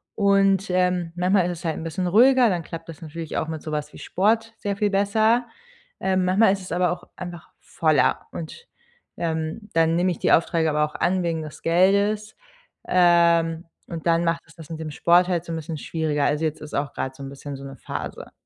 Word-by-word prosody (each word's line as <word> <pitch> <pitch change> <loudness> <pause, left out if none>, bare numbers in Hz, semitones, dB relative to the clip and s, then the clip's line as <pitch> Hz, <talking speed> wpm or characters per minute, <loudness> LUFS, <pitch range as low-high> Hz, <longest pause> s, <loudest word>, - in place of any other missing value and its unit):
und, 195 -1 +3
ähm, 180 -2 +1
manchmal 180 +1 +2
ist 170 - -6
es 180 - -11
halt 160 - 0
'n - - -6
bisschen 165 +3 -2
ruhiger, 250 +6 +5
dann 175 -3 -1
klappt 165 +1 -8
das 160 - -10
natürlich 160 0 -7
auch 155 - -1
mit 160 -2 -5
sowas 150 -2 -4
wie - - -11
Sport 225 +4 0
sehr 200 -1 -3
viel 210 0 +1
besser. 220 +4 +2 0.5
Ähm, 190 -1 +1
manchmal 190 +2 +4
ist 195 - -4
es 185 - -10
aber 180 0 +1
auch 175 - -5
einfach 175 -2 -8
voller 155 -3 +1
und, 170 - -8 0.5
ähm, 160 +5 -3
dann 165 0 +3
nehme 180 +1 +2
ich 175 - -5
die - - +1
Aufträge 165 -1 +2
aber 150 0 +2
auch 150 - -10
an 185 +1 +1
wegen 165 -2 -1
des 155 - -10
Geldes, 200 +5 +2 0.5
ähm, 170 -2 +3 0.2
und 165 0 -6
dann 165 0 +3
macht 165 0 0
es - - -19
das 160 -3 -12
mit 160 -1 -6
dem 160 -1 -5
Sport 175 +4 +4
halt 175 -2 0
so 170 - -7
'n - - -2
bisschen 160 0 -5
schwieriger. 155 -2 -2
Also, 150 +2 +1
jetzt 155 -1 -3
ist 150 - -10
auch 140 0 -2
gerade 130 - -4
so 140 - -13
'n 135 - -6
bisschen 140 +1 -8
so 135 - -11
'ne 135 - -8
Phase. - - -7
170 Hz, 220 wpm, -23 LUFS, 160-190 Hz, 0.5 s, ruhiger